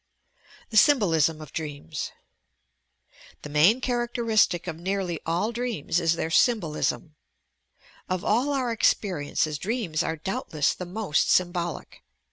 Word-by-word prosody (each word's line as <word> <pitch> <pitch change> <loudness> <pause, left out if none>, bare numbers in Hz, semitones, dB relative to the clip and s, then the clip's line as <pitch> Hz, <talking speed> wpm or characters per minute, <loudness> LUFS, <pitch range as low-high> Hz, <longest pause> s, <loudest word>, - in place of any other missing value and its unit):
THE 220 - 0
SYMBOLISM 165 - +4
OP 150 - -13
DREAMS 150 -1 -5 1.3
The 150 - -7
main 170 - +4
characteristic 235 -7 +1
of 175 -3 -4
nearly 185 -2 -2
all 175 +7 0
dreams 235 - -2
is 165 -2 +2
their 165 0 -3
symbolUm. 170 -7 +1 1.0
Of 185 -1 -2
all 245 +7 +2
our 260 -4 0
experiences, 155 -8 0
dreams 200 - -2
are 160 - -2
doubt 190 +4 -5
less 150 - +2
the 180 - -7
most 195 -4 0
symbolic. 175 -2 -1
180 Hz, 120 wpm, -26 LUFS, 160-225 Hz, 1.3 s, SYMBOLISM